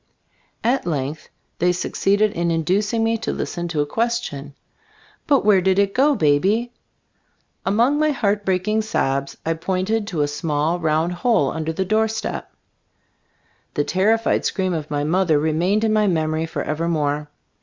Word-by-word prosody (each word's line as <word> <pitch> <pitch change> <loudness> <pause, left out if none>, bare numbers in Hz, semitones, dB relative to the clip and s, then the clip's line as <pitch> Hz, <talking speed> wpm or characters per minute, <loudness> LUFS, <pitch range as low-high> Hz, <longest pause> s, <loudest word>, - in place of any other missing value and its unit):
At 245 -4 +1
length 150 -1 -3 0.3
they 180 +1 +3
succeeded 200 +3 +1
in 170 -2 -2
induc 175 +5 +1
ing 230 -1 0
me 225 0 +1
to - - -2
listen 175 -1 -4
to 160 -3 -1
a - - 0
question, 190 - -3 0.7
"But 280 -7 +3
where 200 -3 +5
did 190 +1 +2
it 200 0 +2
go, 285 +3 +3
Baby 195 - +2 0.5
?" - - -45
Among 235 +9 +3
my 310 0 +3
heart 210 -7 0
breaking 195 +3 0
sobs 140 -10 -1
I 165 - +1
pointed 190 +6 -1
to 170 -8 -2
a - - 0
small 150 +3 -1
round 160 +1 +1
hole 180 - +1
under 160 0 -3
the 190 +4 -2
doorstep. 220 +2 -1 1.2
The 145 - +1
terrified 220 +7 +1
scream 185 -2 -1
of 155 -2 -4
my 145 -1 -1
mother 165 0 +2
remained 165 +8 +1
in 220 -1 +2
my 215 -1 +3
memory 160 -2 0
forever 160 +1 -3
more. 150 -2 -1
180 Hz, 160 wpm, -21 LUFS, 155-215 Hz, 1.2 s, where